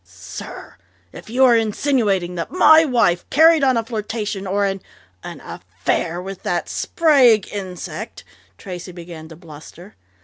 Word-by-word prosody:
"Sir, -, -, -11 dB, 0.4 s
if -, -, -12 dB
you 260 Hz, +3 st, +3 dB
are 240 Hz, -2 st, +5 dB
insinuating 215 Hz, -5 st, 0 dB
that 170 Hz, -2 st, -5 dB
my 320 Hz, -3 st, +6 dB
wife 235 Hz, -, +1 dB
carried 320 Hz, 0 st, +5 dB
on 260 Hz, -3 st, +3 dB
a 230 Hz, -, 0 dB
flirtation 215 Hz, -3 st, -4 dB
or 200 Hz, +2 st, 0 dB
an 195 Hz, -1 st, -3 dB, 0.4 s
an -, -, -8 dB
affair 170 Hz, +2 st, -4 dB
with 190 Hz, +1 st, -8 dB
that -, -, -2 dB
Sprague 260 Hz, -, +3 dB
insect 185 Hz, 0 st, -7 dB, 0.2 s
" -, -, -35 dB
Tracey 180 Hz, -2 st, -8 dB
began 170 Hz, -2 st, -10 dB
to 160 Hz, -, -12 dB
bluster. 165 Hz, +3 st, -14 dB
205 Hz, 145 wpm, -20 LUFS, 180-245 Hz, 0.4 s, my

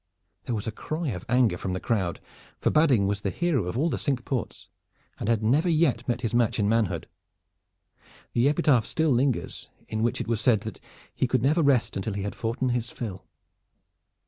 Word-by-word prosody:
There 120 Hz, -, -1 dB
was 105 Hz, -, -4 dB
a 110 Hz, -, -2 dB
cry 155 Hz, +7 st, -4 dB
of 90 Hz, -6 st, -5 dB
anger 120 Hz, -7 st, +3 dB
from 95 Hz, -, -3 dB
the 95 Hz, -, -2 dB
crowd, 95 Hz, -7 st, -1 dB, 0.4 s
for -, -, +1 dB
Badding 140 Hz, -10 st, +4 dB
was 100 Hz, 0 st, -1 dB
the -, -, -1 dB
hero 165 Hz, -, 0 dB
of 90 Hz, +6 st, -3 dB
all 150 Hz, +6 st, +2 dB
the 165 Hz, -, -1 dB
Cinque 130 Hz, -3 st, -1 dB
Ports 125 Hz, -7 st, -4 dB, 0.5 s
and 105 Hz, -, -2 dB
had 115 Hz, -2 st, +2 dB
never 145 Hz, +11 st, +3 dB
yet 155 Hz, -7 st, +2 dB
met 120 Hz, -1 st, -1 dB
his 115 Hz, -2 st, -2 dB
match 120 Hz, -2 st, +2 dB
in 105 Hz, -3 st, +1 dB
manhood. 105 Hz, -7 st, 0 dB, 1.3 s
The 120 Hz, +4 st, +3 dB
epitaph 140 Hz, -6 st, +3 dB
still 160 Hz, -2 st, +1 dB
lingers 130 Hz, 0 st, 0 dB, 0.2 s
in 110 Hz, 0 st, -3 dB
which 120 Hz, +1 st, 0 dB
it -, -, -4 dB
was 115 Hz, -1 st, 0 dB
said 110 Hz, -3 st, +3 dB
that 110 Hz, 0 st, -7 dB, 0.3 s
he -, -, 0 dB
"could -, -, +1 dB
never 155 Hz, +5 st, +3 dB
rest 140 Hz, -5 st, +2 dB
until 100 Hz, +2 st, -2 dB
he 100 Hz, -1 st, -3 dB
had 100 Hz, -, -3 dB
foughten 120 Hz, +3 st, -2 dB
his 120 Hz, -1 st, -1 dB
fill." 100 Hz, -7 st, -7 dB
120 Hz, 200 wpm, -26 LUFS, 105-135 Hz, 1.3 s, Badding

